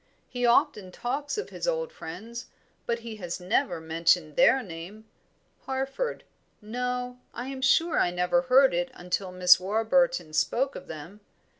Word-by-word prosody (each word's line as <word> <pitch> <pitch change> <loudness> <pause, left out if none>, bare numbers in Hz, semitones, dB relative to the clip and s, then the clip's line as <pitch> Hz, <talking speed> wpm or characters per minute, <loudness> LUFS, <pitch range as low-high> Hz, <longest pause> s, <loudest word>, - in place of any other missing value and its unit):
"He 245 -1 -1
often 210 -5 +2
talks 285 - -3
of 420 - -4
his - - -5
old - - -1
friends, 230 +9 -8 0.4
but 235 0 -1
he 225 -2 -7
has 175 -3 -5
never 180 +4 0
mentioned 160 -1 +1
their 265 -1 +5
name. 185 +4 -9 0.6
Harford 270 - -3 0.4
no, 250 +2 -4 0.2
I 245 +2 -5
am 270 -1 -6
sure 325 +6 +3
I - - +3
never 180 +9 +1
heard 260 -1 +5
it 175 0 0
until 180 +1 -3
Miss 180 0 +6
Warburton 220 - +1
spoke 265 - +1
of 185 - -9
them. 160 +6 -9
230 Hz, 150 wpm, -27 LUFS, 180-260 Hz, 0.6 s, Miss